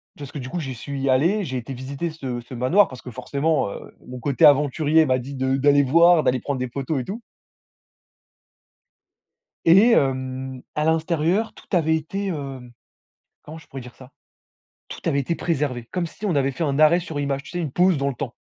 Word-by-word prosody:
tu - - -22
vois - - -6
ce 135 - -15
que 150 - -5
du 130 0 -7
coup 175 - -3
j'y 130 -3 -5
suis 140 +4 -6
y 135 - 0
aller. 170 +11 +2
J'ai 130 -6 -4
été 125 +2 -6
visiter 140 +6 -5
ce 130 -6 -5
ce 120 +2 -12
manoir 145 +11 +3
parce 130 -2 -11
que 125 - -9
forcément, 140 +2 -1
heu, - - -10
mon 125 0 -8
côté 135 0 +2
aventurier 150 +2 +4
m'a 130 -2 +2
dit 135 +3 -7
de 130 0 0
d'aller 145 +1 +4
voir, 170 +4 +5
d'aller 125 0 +1
prendre 140 0 -3
des 125 0 -3
photos 135 +2 -3
et - - -5
tout. 220 +5 -6 2.5
Et 165 - +8 0.2
hem, 130 - -1
à 150 +1 0
l'intérieur 165 +6 +1
tout - - -17
avait 160 -2 +2
été, 195 +6 -3
heu, 140 -5 -5 0.8
comment 155 +2 -10
je 160 - -14
pourrais 135 -1 -8
dire 125 0 -12
ça? 130 +1 -15 0.8
Tout - - -8
avait 140 - +1
été 155 +5 -2
préservé, 140 -8 -2
comme 180 -2 -2
si 190 +7 -9
on 195 - +1
avait 140 -1 +1
fait 150 +6 -4
un 145 -1 -1
arrêt 160 +3 +6
sur 160 -4 -6
image 140 -1 -2
tu - - -12
sais? 175 - -4
Une 155 -5 -3
pause 180 +2 +3
dans 140 0 -1
le 135 - -5
temps. 125 -2 -5
140 Hz, 220 wpm, -23 LUFS, 130-160 Hz, 2.5 s, Et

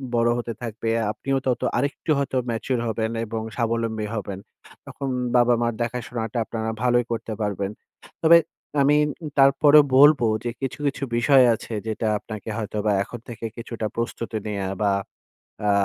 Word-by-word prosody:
বড় 115 0 +3
হতে 120 -1 -3
থাকবে। 115 -1 -4 0.2
আপনিও 135 +5 -2
তত 125 -2 +1 0.2
আরেকটু 145 +2 -1
হয়ত 140 -1 -2 0.2
ম্যাচুর 115 +2 -1
হবেন 110 0 -1
এবং 110 0 -4 0.2
স্বাবলম্বী 115 -2 -1
হবেন। 100 -2 -4 0.5
তখন 135 -1 -5 0.3
বাবা-মার 120 -1 +3
দেখাশোনাটা 120 -1 -3
আপনারা 110 -1 -3
ভালোই 120 -1 +3
করতে 115 -1 -3
পারবেন। 100 -1 -2 0.5
তবে 170 +1 +8 0.4
আমি 145 +2 +4
ম 155 +1 -7
তারপরেও 145 +2 +7
বলবো 145 -3 +7 0.2
যে 120 - -1
কিছু, 130 -1 -4
কিছু 140 0 -2
বিষয় 130 +2 +6
আছে 115 +1 -6
যেটা 110 +1 -2
আপনাকে 110 +1 -8
হয়তোবা 105 -1 -1
এখন 120 +4 -9
থেকে 115 -1 -6
কিছুটা 115 -1 -5
প্রস্তুতি 115 -1 -3
নেয়া 100 -2 -2
বা 100 - +3 0.7
অ্যা 105 -1 +2
115 Hz, 150 wpm, -24 LUFS, 110-130 Hz, 0.7 s, তবে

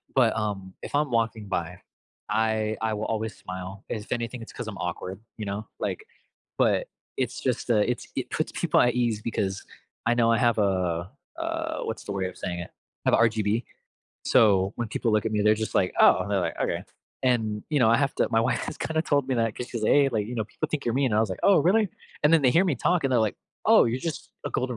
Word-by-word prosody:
but, 120 -4 +4
um, 100 -4 -3
if - - -5
I'm 145 -2 +1
walking 115 -2 0
by, 90 -1 -3 0.5
I 110 0 +1
I 110 -1 0
will 110 - -3
always 110 -1 -2
smile. 95 +2 -7
If 105 -2 -5
anything, 120 0 -3
it's 115 - -9
'cause 120 -3 -6
I'm 100 - -6
awkward, 90 +2 -4 0.2
you 110 - -4
know, 100 +2 -4
like 430 - -3 0.5
but - - +2 0.3
it's 125 -2 -2
just, 125 -1 -1
uh, 115 - +4
it's 120 +3 0
it - - -3
puts - - -1
people - - +2
at 125 0 +3
ease 120 -4 0
because 100 -3 -2 0.4
I 120 - +4
know 115 -1 +4
I 115 - +4
have 120 -2 +3
a, 90 -3 0 0.3
uh - - -2
uh, 325 -1 -3
what's 115 - -5
the - - -5
way 95 -1 -1
of 90 - -10
saying 90 -1 -4
it? 85 - -7 0.3
I - - +4
have - - +4
RGB, 110 0 +2 0.6
so 100 -5 +4
when 120 -2 -3
people 115 +1 -1
look 110 +1 +2
at 110 - -1
me, 105 -1 +1
they're 105 0 +5
just 110 0 -4
like, 90 - +2
"Oh," - - +7
and - - -6
they're - - +2
like, - - -2
"Okay," - - -1 0.4
and, 110 -5 +1
you 150 - +2
know, 115 -4 +5
I 115 - +5
have 140 -1 +1
to - - +2
my 115 -1 +3
wife 115 - +1
has - - -5
kinda 160 0 -1
told 145 -4 +1
me 130 - +1
that 115 -1 +2
because 120 +3 -6
she's 115 - -5
like, 110 - +3
"Hey," 140 -1 +5
like, 110 -4 -1
you 120 - -5
know, 110 -2 -1
"People 155 +8 -4
think 150 -2 -2
you're 115 - +1
mean," 135 -3 +1
I 105 - +3
was 110 - +1
like, 95 - -5
"Oh, 200 - +6
really," 200 +6 +3 0.3
and 150 - +4
then 165 - +6
they 130 - +5
hear 170 +8 +4
me 175 -6 +1
talk, 175 +6 +1
and 135 - +1
they're 120 - +4
like, 105 -4 0 0.3
"Oh, - - +7
you're 120 +3 -1
just 160 -2 -5 0.2
a - - -3
golden 125 -1 -2
115 Hz, 250 wpm, -26 LUFS, 105-130 Hz, 0.6 s, Oh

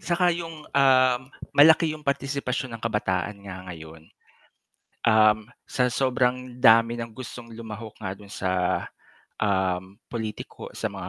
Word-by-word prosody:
saka 175 0 +2
yung, 165 -2 -6
um, 130 -3 +4 0.3
malaki 155 +2 +6
yung 155 - -8
partisipasyon 135 -2 -2
ng 115 - -19
kabataan 105 -3 -1
nga 95 -2 -7
ngayon. 80 -2 -10 1.0
Um, 110 0 +4 0.2
sa 125 -1 +1
sobrang 125 0 0
dami 115 -1 +6
ng 115 0 -5
gustong 120 0 -9
lumahok 110 -1 -8
nga 95 -3 -4
dun 100 0 -15
sa, 95 -2 0 0.5
um, 95 -1 -1
politiko 110 -3 -6
sa - - -3
mga - - -7
115 Hz, 130 wpm, -25 LUFS, 105-130 Hz, 1.0 s, malaki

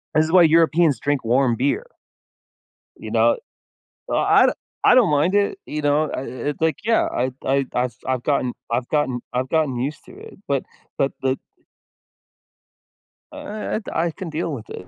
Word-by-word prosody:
this 155 0 +4
is 160 - -4
why 180 0 +7
Europeans 165 -2 +4
drink 145 -2 -1
warm 120 +1 +2
beer 140 - 0 1.1
you - - -8
know? - - +3 0.7
I - - +4
I - - +6
don - - 0 0.3
I - - +6
don't 250 -7 +5
mind 150 +6 +2
it. 205 - +1
You 150 0 -4
know? 145 +1 +2
Uh 155 - -4
uh - - -3 0.3
It 150 - -6
like 160 0 +1
Yeah. 225 +1 +3
I 130 +2 -1
I 135 0 +1
I've 125 -2 -1
I've 130 -2 -1
gotten 130 -3 0 0.2
I've 120 +1 -1
gotten 140 -5 0
I've 125 +1 -1
gotten 155 -5 +1
used 135 +5 -4
to - - -13
it, - - -13
but 140 -2 0 0.3
but 135 - +1
but 130 0 0 1.9
Uh, 210 +1 -4
it 220 - -7
I 165 +1 0
can 180 +1 -7
deal 160 +1 -3
with 115 -6 -8
it. 90 - -8
145 Hz, 180 wpm, -22 LUFS, 130-165 Hz, 1.9 s, why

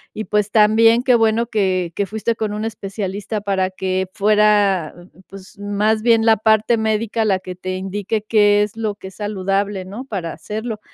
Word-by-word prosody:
y 220 - -3
pues, 210 -1 0
también 225 +2 +4
qué 255 - +3
bueno 225 0 +2
que 185 -6 -1
que 200 - -1
fuiste 220 +3 -2
con 215 -2 -3
un 215 +1 -3
especialista 205 0 -4
para 190 -2 0
que 190 0 -2
fuera, 205 -4 +2 0.3
pues, 195 +1 -14
más 210 +2 0
bien 225 -1 +3
la 225 -1 +5
parte 220 +2 +2
médica 220 +1 -1
la 195 -3 +2
que 185 -1 -8
te 185 +1 -5
indique 200 +3 -3
qué 205 -1 +4
es 210 +1 -6
lo 215 -2 -2
que 195 - -10
es - - -18
saludable, 195 -1 -2
¿no?, 215 +8 -8
para 185 -9 -4
hacerlo. 220 0 -6
210 Hz, 180 wpm, -19 LUFS, 195-220 Hz, 0.3 s, la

